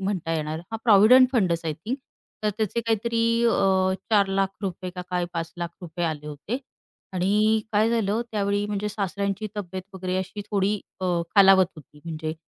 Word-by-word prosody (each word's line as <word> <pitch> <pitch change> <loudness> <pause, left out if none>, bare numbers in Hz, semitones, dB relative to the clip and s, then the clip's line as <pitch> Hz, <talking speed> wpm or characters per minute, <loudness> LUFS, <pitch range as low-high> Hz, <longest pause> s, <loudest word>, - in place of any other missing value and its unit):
म्हणता 190 -4 -2
येणार. 155 0 -2
हां, 225 - -4
प्रॉव्हिडंट 235 +4 +7
फंडच 180 -9 +1
आय 160 - -1
थिंक. 230 - -4 0.4
तर 210 - +2
त्याचे 220 +1 -1
काहीतरी 230 +1 0 0.2
अ, 190 -4 +3 0.2
₹4,00,000 195 -2 0
का 180 - -5
काय 180 -1 0
₹5,00,000 170 0 -5
आले 150 -2 -4
होते 150 - -4 0.5
आणि 210 +4 +2
काय 215 +2 +3
झालं? 225 -1 +1
त्यावेळी 205 -1 0
म्हणजे 210 0 -2
सासऱ्यांची 200 0 -2
तब्येत 185 -2 -5
वगैरे 185 0 -2
अशी 190 +2 -5
थोडी 205 0 +1 0.2
अ, 185 - -2 0.3
खालावत 195 -2 +7
होती 150 0 -15
म्हणजे 160 -1 -4
195 Hz, 150 wpm, -25 LUFS, 175-210 Hz, 0.5 s, प्रॉव्हिडंट